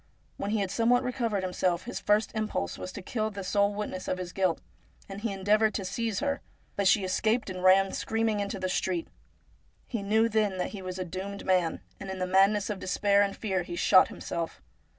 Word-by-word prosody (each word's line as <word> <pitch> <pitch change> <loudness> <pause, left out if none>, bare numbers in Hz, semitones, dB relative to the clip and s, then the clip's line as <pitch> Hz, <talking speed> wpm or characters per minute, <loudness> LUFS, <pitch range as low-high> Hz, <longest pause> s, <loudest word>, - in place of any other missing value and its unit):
When 200 - -3
he 215 0 +1
had 195 -2 -2
somewhat 240 +3 +3
re 250 - -1
covered 225 -6 -1
himself, 180 -1 0
his 245 - -5
first 210 0 +2
impulse 215 - -2
was 185 - -6
to 200 - -7
kill 215 +2 -1
this 200 -3 -6
sole 200 0 +3
witness 205 -3 -4
of - - -1
his 180 -1 -6
guilt, 185 -4 +1 0.5
and 195 +1 -7
he 225 -1 -1
endeavoured 210 +3 +2
to 195 - -2
seize 225 +4 -2
her. 280 -1 -1 0.3
But 200 -1 +1
she 200 +1 +4
escaped, 215 +4 0
and 185 0 -6
ran 190 +1 +5
screaming 225 -1 0
into 200 0 -3
the 185 - -1
street. 185 -2 -1 0.8
He 230 -5 -4
knew 220 +3 +3
'then 215 -4 +1
that 180 - -1
he 200 - -7
was 185 0 -5
a 185 - -3
doomed 190 +3 -6
man, 180 -3 +1 0.2
and 195 - -7
in 190 - -4
the 185 - -1
madness 195 +3 +3
of 200 - -4
despair 200 +2 +2
and 200 -1 0
fear 190 -4 -1
he 175 0 -6
shot 185 +2 +6
himself. 165 -1 -5
200 Hz, 215 wpm, -29 LUFS, 185-215 Hz, 0.8 s, shot